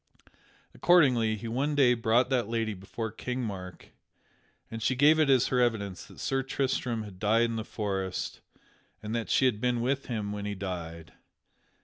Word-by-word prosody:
Accordingly, 125 -11 +4
he 110 +2 -7
one 135 +6 -1
day 130 -4 +5
brought 120 +2 +2
that 125 -5 +1
lady 115 -1 -1
before 100 +4 -6
King 125 +3 -4
Mark, 95 -5 -7 0.8
and 115 0 -5
she 130 +4 +1
gave 150 +4 +5
it 155 -3 +3
as 130 -3 +4
her 125 - +1
evidence 100 -6 -1
that - - -15
Sir 135 0 0
Tristram 130 -3 -1
had 100 -3 -11
died 110 +3 +3
in 115 -1 0
the 110 - -3
forest 95 -4 -3 0.6
and 105 +1 -4
that 115 -1 -2
she 130 - +3
had 115 -5 +1
been 125 -1 +1
with 135 +3 -1
him 105 -4 -3
when 105 0 -5
he 105 0 -3
died. 85 -4 -6
115 Hz, 175 wpm, -29 LUFS, 105-125 Hz, 0.8 s, day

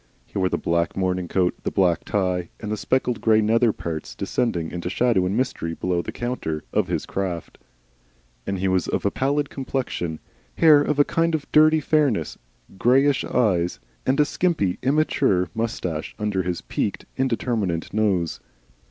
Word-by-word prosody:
He - - -5
wore 95 -1 +2
the - - 0
black 85 0 0
morning 90 -1 0
coat, 90 0 +1
the - - -2
black 90 -4 +2
tie, 90 -3 -1
and 105 -2 -5
the - - +1
speckled 125 +2 0
grey 110 -1 +4
nether 115 +2 +3
parts 80 -5 -6
(descending 85 -9 -1
into 90 0 -4
shadow 105 -3 +2
and 100 +4 -1
mystery 120 -10 -2
below 90 0 -1
the - - -6
counter) 120 -11 -3
of - - +2
his - - -2
craft. 90 -4 -4 0.9
He 95 -1 -1
was 95 -1 +1
of - - -2
a 100 - +2
pallid 140 +2 0
complexion, 125 - -3 0.4
hair 155 -3 +7
of 145 0 0
a 145 - +5
kind 165 0 +1
of 150 - -4
dirty 155 +1 +5
fairness, 140 - +1 0.4
greyish 135 +3 +4
eyes, 90 -8 +1 0.2
and 135 +3 +1
a 150 - +6
skimpy, 150 - 0
immature 130 - +2
moustache 100 -9 -3
under 105 -3 -1
his 90 -2 -3
peaked - - -3
indeterminate 115 -9 -1
nose. 100 -6 0
105 Hz, 160 wpm, -23 LUFS, 90-130 Hz, 0.9 s, hair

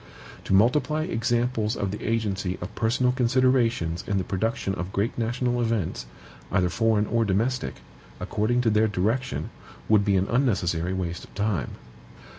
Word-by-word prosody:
To - - 0
multiply 140 +8 +3
examples 120 -6 0
of 100 -2 -2
the 105 - -6
agency 100 -5 -1
of 90 - -7
personal 120 +2 +1
considerations 120 -8 +1
in 100 - 0
the 95 - 0
production 100 +1 -1
of 90 0 -4
great 100 +3 -1
national 120 +1 -1
events, 110 - -1 0.4
either 90 -2 +2
foreign 105 +4 +2
or 115 +2 +1
domestic, 115 +5 0 0.4
according 110 +3 0
to 115 -2 +2
their 110 +1 +3
direction, 110 +6 -1 0.4
would 105 -2 +4
be 100 -1 +2
an 95 - +2
unnecessary 95 -8 0
waste 85 -2 -3
of - - -21
time. 100 - -1
110 Hz, 150 wpm, -25 LUFS, 95-120 Hz, 0.4 s, would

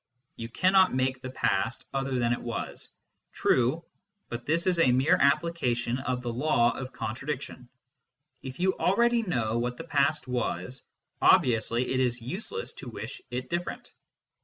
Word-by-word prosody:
You 115 0 -6
cannot 185 +5 +4
make 130 0 0
the 130 - -6
past 130 - -1
other 135 -1 -1
than 120 -1 +2
it - - -4
was 120 -1 -5 0.4
true, 130 +7 +1 0.4
but 120 0 -6
this 165 +3 +1
is 180 -2 +2
a 130 -6 +5
mere 130 +5 +4
application 130 -5 +1
of 125 -1 -2
the 120 -1 -3
law 120 -2 +3
of 130 +1 -6
contradiction. 125 +2 -5 0.7
If 130 -1 -8
you 185 +1 +2
already 235 +5 +3
know 120 - -1
what 125 +1 -2
the - - -6
past 140 0 +1
was, 125 -2 -3 0.4
obviously 120 +1 +3
it 130 - +1
is 125 -2 +1
use 160 - -5
less 465 +1 -4
to - - -7
wish - - -7
it 125 +1 -4
different. 175 +1 -4
130 Hz, 160 wpm, -28 LUFS, 120-160 Hz, 0.7 s, a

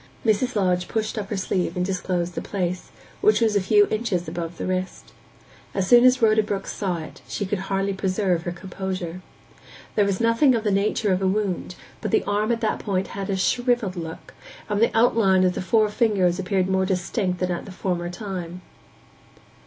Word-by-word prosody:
Mrs. 225 +3 +1
Lodge 180 -3 +1
pushed 220 -1 -2
up 205 -3 -4
her 210 - -2
sleeve 185 -1 -1
and 180 - +1
disclosed 180 -2 -2
the - - -4
place, 180 -2 -3 0.3
which 425 +1 +4
was 225 -3 +2
a 200 - +3
few 205 +2 +5
inches 215 -6 -1
above 165 +1 -5
the - - -4
wrist. 185 0 -4 0.6
As 195 -2 +1
soon 240 +4 +7
as 255 -1 +5
Rhoda 220 0 +5
Brook 200 -2 -3
saw 185 -4 -2
it, 160 -1 -9
she 200 - -3
could 195 +1 -2
hardly 195 0 0
preserve 190 -2 0
her 175 - -4
composure. 185 -1 -5 0.7
There 210 - +3
was 195 -2 -1
nothing 230 +3 +4
of 225 - -1
the 210 - +1
nature 200 0 +1
of 185 - -1
a 190 - +2
wound, 190 -2 -1 0.3
but 215 - -2
the - - +2
arm 210 +3 0
at 230 - -1
that 220 - 0
point 190 -2 -2
had 195 0 -5
a 195 - 0
shrivelled 240 -1 +1
look, 165 -2 -7 0.3
and 210 0 -1
the 230 - +3
outline 220 -5 +4
of 180 -1 +3
the - - -3
four 215 +3 +3
fingers 200 -5 +2
appeared 185 0 0
more 190 0 +1
distinct 185 0 -1
than 180 -1 0
at 175 - -3
the - - -9
former 180 -2 -2
time. 180 -2 -6
195 Hz, 200 wpm, -24 LUFS, 180-215 Hz, 0.7 s, soon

